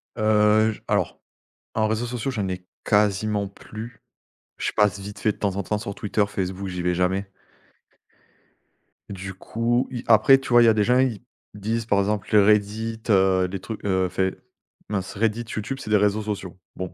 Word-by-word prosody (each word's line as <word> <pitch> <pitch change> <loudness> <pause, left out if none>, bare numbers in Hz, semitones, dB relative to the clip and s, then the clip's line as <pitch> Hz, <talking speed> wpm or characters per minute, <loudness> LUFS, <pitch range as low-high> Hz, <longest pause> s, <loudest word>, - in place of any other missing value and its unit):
Heu, 110 0 +4
je - - -14
alors, - - 0 0.6
en 110 -1 +2
réseaux 110 +2 -1
sociaux, 125 +2 -3
j'en 100 -5 -2
ai 90 0 -5 0.2
quasiment 105 0 +2
plus. 110 +3 -10 0.6
Je - - -2
passe 105 -1 +2
vite 100 +1 -8
fait 110 - +2
de - - -11
temps 100 -2 -1
en 100 - -2
temps 105 +3 -1
sur 100 -2 -6
Twitter, 105 0 0
Facebook, 95 0 -4
j'y 90 -1 -4
vais 90 - +1
jamais. 95 +2 0 1.8
Du 95 -1 -6
coup, 115 +5 -1
i 120 -1 -5
après 115 +4 +7
tu 135 - -8
vois 120 0 +6
il - - +5
y - - +5
a - - +5
des 105 -1 +2
gens, 125 +3 +3
ils 130 -5 +1 0.3
disent 110 +2 -2
par 100 -3 +2
exemple 100 0 -1
les 105 - +6
Reddit, 105 +2 +1
heu, 95 -2 +4
les 95 - -4
trucs 110 +3 -7
heu, 95 -2 +1
enfin 95 +1 0 0.6
mince 100 -1 -3
Reddit, 115 +2 0
YouTube 110 +5 -3
c'est - - -8
des 105 - +5
réseaux 105 +1 +2
sociaux. 100 -4 -5 0.2
Bon. 90 -1 -5
105 Hz, 190 wpm, -24 LUFS, 95-110 Hz, 1.8 s, après